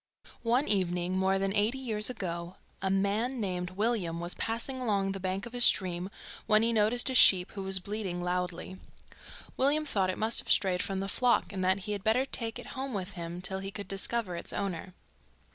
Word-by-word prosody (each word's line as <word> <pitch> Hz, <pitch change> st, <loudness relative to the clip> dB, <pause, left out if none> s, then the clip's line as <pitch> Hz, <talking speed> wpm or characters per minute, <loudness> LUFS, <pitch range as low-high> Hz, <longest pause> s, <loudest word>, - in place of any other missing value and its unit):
One 245 Hz, +5 st, +2 dB
evening 180 Hz, -2 st, +1 dB
more 190 Hz, +1 st, +2 dB
than 195 Hz, 0 st, 0 dB
eighty 215 Hz, +5 st, +1 dB
years 220 Hz, -5 st, +1 dB
ago 175 Hz, -6 st, -5 dB, 0.3 s
a 190 Hz, -, 0 dB
man 205 Hz, +7 st, 0 dB
named 180 Hz, -4 st, -2 dB
William 190 Hz, -4 st, -1 dB
was 175 Hz, +1 st, -3 dB
passing 240 Hz, +3 st, -3 dB
along 200 Hz, -5 st, 0 dB
the 195 Hz, -, -5 dB
bank 190 Hz, +3 st, -2 dB
of 235 Hz, -, -9 dB
a 245 Hz, -, -4 dB
stream 185 Hz, -4 st, +3 dB, 0.4 s
when 215 Hz, 0 st, +5 dB
he 230 Hz, 0 st, +2 dB
noticed 225 Hz, +4 st, +2 dB
a -, -, -2 dB
sheep 185 Hz, -6 st, +6 dB
who 200 Hz, -, -6 dB
was 190 Hz, 0 st, +5 dB
bleating 195 Hz, -2 st, -4 dB
loudly. 180 Hz, +1 st, -3 dB, 0.8 s
William 295 Hz, +3 st, +3 dB
thought 195 Hz, -9 st, 0 dB
it 185 Hz, -, -2 dB
must 220 Hz, +2 st, +2 dB
have -, -, -7 dB
strayed 185 Hz, -2 st, +3 dB
from 195 Hz, -1 st, -2 dB
the 195 Hz, -, -3 dB
flock, 245 Hz, -1 st, +1 dB
and 190 Hz, -1 st, -2 dB
that 190 Hz, +2 st, +2 dB
he 210 Hz, -, -5 dB
had 200 Hz, -2 st, -3 dB
better 235 Hz, +5 st, +3 dB
take 230 Hz, -4 st, -4 dB
it 245 Hz, -, -9 dB
home 265 Hz, -3 st, -4 dB
with 190 Hz, 0 st, -4 dB
him 175 Hz, 0 st, -6 dB
till 190 Hz, +1 st, -3 dB
he 195 Hz, 0 st, -5 dB
could 200 Hz, -1 st, -7 dB
discover 195 Hz, 0 st, -1 dB
its 170 Hz, -, -6 dB
owner. 185 Hz, -2 st, -4 dB
195 Hz, 205 wpm, -30 LUFS, 185-225 Hz, 0.8 s, sheep